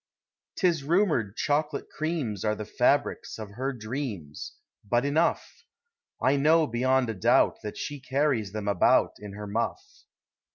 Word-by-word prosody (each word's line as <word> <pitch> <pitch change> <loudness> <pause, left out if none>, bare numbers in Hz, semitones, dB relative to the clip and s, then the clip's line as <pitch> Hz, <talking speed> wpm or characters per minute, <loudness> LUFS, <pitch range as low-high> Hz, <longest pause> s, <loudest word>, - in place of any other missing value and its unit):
'T - - -1
is 165 -5 0
rumored 155 - +1
chocolate 150 0 0
creams 150 - -2
Are 105 -1 +1
the 105 - -6
fabrics 125 +6 +1
of 110 -2 -8
her 130 +6 -2
dreams 110 - -6 0.2
— 100 - -29
Hut 120 +1 +3
euough! 150 +4 +1 0.7
I 135 +2 +3
know 155 +3 +4
bevoud 130 +1 +1
a - - -4
doubt 95 - +3
That 105 - -6
she 145 -1 -5
carries 135 -6 0
them 105 -1 -5
about 100 -3 +4
Iu 100 -1 -9
her 105 0 -6
muff. 115 - -4
130 Hz, 155 wpm, -27 LUFS, 105-145 Hz, 0.7 s, know